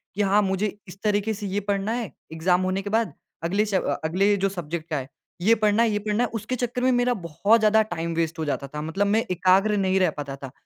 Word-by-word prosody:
कि 205 - 0
हाँ, 200 +1 +4
मुझे 200 +1 -1
इस 185 +2 -11
तरीके 210 +1 +1
से 205 0 -6
ये 195 +2 -1
पढ़ना 200 +1 -1
है 235 -4 -3 0.2
एग्ज़ाम 180 +3 +2
होने 185 +1 0
के 205 - -5
बाद 220 -7 0 0.3
अगले 200 +6 +1
शभ 195 -3 0 0.2
अगले 195 +6 +2
जो 195 0 +1
सब्जेक्ट 170 -3 -5
है। 135 -3 -2 0.3
ये 220 +6 +5
पढ़ना 215 +1 +3
है 230 - +3
ये 210 - 0
पढ़ना 210 +3 0
है, 245 - 0
उसके 225 +3 -3
चक्कर 245 0 -2
में 260 - +4
मेरा 245 0 +2
बहुत 200 +4 +2
ज़्यादा 215 0 +4
टाइम 170 -5 -3
वेस्ट 165 0 -1
हो 160 - -1
जाता 140 -1 -2
था। 150 +2 -6
मतलब 175 +6 -1
मैं 220 +3 +2
एकाग्र 190 +4 +3
नहीं 190 -1 +2
रह 185 -3 +3
पाता 140 -2 -5
था। 135 -2 -9
195 Hz, 240 wpm, -24 LUFS, 175-215 Hz, 0.3 s, ये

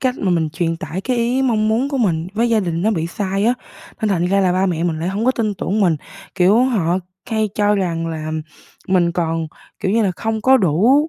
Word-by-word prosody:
cách 255 -1 +1
mà 195 - 0
mình 165 -3 +1
truyền 165 +1 -1
tải 160 +3 -5
cái 250 +5 -1
ý, 240 +3 +1
mong 220 -4 +2
muốn 235 +5 +1
của 275 -2 -2
mình 170 -7 +1
với 235 +2 +2
gia 225 -2 +3
đình 170 -2 -2
nó 215 - +2
bị 165 -6 -1
sai 195 +2 -2
á, 240 +2 +3 0.5
nên 220 - +1
thành 175 -4 +1
ra 195 +2 +2
là 185 -2 +2
ba 185 +1 +2
mẹ 170 -2 -1
mình 160 -2 -1
lại 170 - -1
hông 200 +4 -2
có 255 - +4
tin 220 -5 -1
tưởng 200 +3 -1
mình, 175 -5 +3 0.4
kiểu, 200 +6 +4
họ 190 -8 +1 0.3
hay 220 -1 +1
cho 205 0 +2
rằng 170 -4 -1
là 155 -1 -4 0.6
mình 175 -2 +3
còn, 165 -2 -1 0.3
kiểu 190 - 0
như 225 +1 +3
là, 195 - +2
không 225 -1 -2
có 265 0 +6
đủ 225 - +3
195 Hz, 245 wpm, -19 LUFS, 170-225 Hz, 0.6 s, có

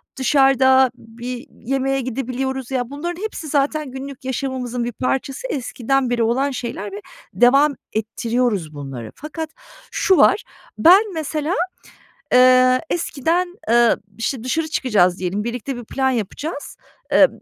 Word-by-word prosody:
dışarıda 265 -1 +4
bir 240 +3 -8 0.2
yemeğe 270 +1 0
gidebiliyoruz. 260 +1 -3
Ya, 245 -2 -1
bunların 345 +6 -5
hepsi 430 -7 -5
zaten 290 0 0
günlük 265 0 -8
yaşamımızın 255 -2 -3
bir 240 - -2
parçası 270 - -2
eskiden 265 - -1
beri 240 -1 +1
olan 265 +5 +1
şeyler 235 -5 -5
ve 205 +1 -7 0.3
devam 275 +5 +5 0.2
ettiriyoruz 225 -5 -1
bunları. 135 -6 -7
Fakat 310 +2 -6 0.4
şu 380 - +3
var: - - +5 0.3
Ben 380 +4 +6
mesela, 310 +1 -2 0.8
eee, 255 0 +6
eskiden, 345 +3 -1
eee, 235 0 +5 0.2
işte, 230 +1 -2
dışarı 315 +6 -1
çıkacağız 205 - +2
diyelim, 185 +3 -2
birlikte 245 +3 -4
bir 240 - -7
plan 265 +3 0
yapacağız. 270 - -4 0.3
Eee, - - +7
260 Hz, 125 wpm, -20 LUFS, 235-280 Hz, 0.8 s, Eee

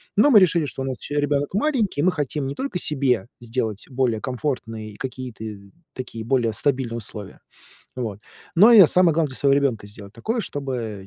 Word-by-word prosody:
Но 240 +8 +5
мы 230 -7 +8
решили, 170 -4 +3
что 135 -1 -5
у - - -3
нас 130 -2 -3
еще 145 - -5
ребенок 145 +1 0
маленький, 225 - 0
и - - +2
мы 185 - +4
хотим 145 -3 -2
не 135 - -3
только 270 -8 -3
себе 135 - 0
сделать 115 -3 -3
более 125 -4 0
комфортные 120 -5 -4
и 105 - -15
какие-то 130 -3 -7 0.5
такие 120 -3 -7
более 115 -2 +1
стабильные 120 0 -1
условия, 105 -3 -10 0.6
вот. 115 -6 -4 0.4
Но 215 +7 +8
и 210 -5 +10
самое 180 -3 +4
главное 160 -2 +1
для 130 - -9
своего 140 -1 +3
ребенка 135 -7 0
сделать 100 -1 -12
такое, 220 - -2
чтобы 125 - -5
130 Hz, 190 wpm, -23 LUFS, 115-150 Hz, 0.6 s, и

